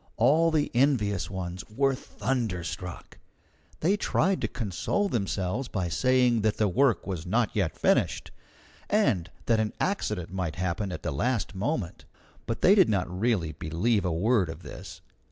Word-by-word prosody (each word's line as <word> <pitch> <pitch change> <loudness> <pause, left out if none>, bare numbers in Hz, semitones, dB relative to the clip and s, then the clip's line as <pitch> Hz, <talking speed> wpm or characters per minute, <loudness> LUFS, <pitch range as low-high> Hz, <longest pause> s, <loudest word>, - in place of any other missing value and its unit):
All 155 +8 +4
the 155 -2 0
envious 120 -7 +2
ones 95 -1 -5
were 135 +5 +1
thunderstruck. 95 -9 -4 0.6
They 185 +6 +3
tried 195 -1 +1
to - - 0
console 115 - -1
themselves 100 - -1
by 95 -6 -2
saying 125 +3 +3
that 110 0 +1
the 105 - +2
work 120 0 +2
was 90 -3 -4
not 115 +4 +1
yet 95 -6 0
finished, - - +1 0.6
and 130 - +2 0.2
that 115 -1 +3
an 110 -1 -1
accident 105 - -2
might 90 -5 -2
happen 90 +3 -2
at - - -6
the 85 - -2
last 115 - -1
moment. 100 - -3 0.4
But 115 - -3
they 190 - +7
did 195 -3 +5
not 90 -3 -1
really 105 -8 +1
believe 95 +9 0
a 90 - 0
word 95 +2 +2
of 80 +2 -8
this. - - -9
105 Hz, 155 wpm, -27 LUFS, 90-130 Hz, 0.6 s, they